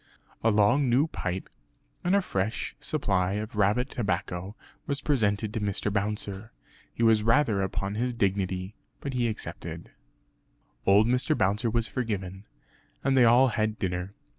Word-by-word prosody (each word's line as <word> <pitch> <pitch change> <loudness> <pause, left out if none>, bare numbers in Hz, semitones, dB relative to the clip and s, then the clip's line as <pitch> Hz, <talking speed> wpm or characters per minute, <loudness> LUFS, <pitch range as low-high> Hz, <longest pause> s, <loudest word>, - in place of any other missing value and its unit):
A 115 - +4
long 115 +6 +3
new 130 +5 +4
pipe 95 - -4 0.6
and 180 +3 +2
a 200 - +3
fresh 100 - -2
supply 95 -11 0
of 105 +1 -4
rabbit 105 +5 +2
tobacco 95 -3 -3 0.3
was 140 -1 0
presented 110 -7 0
to 110 - -1
Mr. 100 0 -1
Bouncer. 105 +1 -3 0.4
He 115 - -3
was 110 -2 +5
rather 115 -2 +3
upon 95 +1 -2
his 120 +4 -1
dignity; 95 -3 -1 0.3
but 140 - -5
he 120 -2 +1
accepted. 110 - -6 1.0
Old 100 +2 +6
Mr. 125 +6 +2
Bouncer 105 +5 +1
was 115 0 +1
forgiven, 100 -5 -4 0.6
and 135 0 +2
they 125 -2 +6
all 125 +3 +6
had 110 -1 -1
dinner. 90 +1 -3
105 Hz, 145 wpm, -27 LUFS, 100-120 Hz, 1.0 s, Old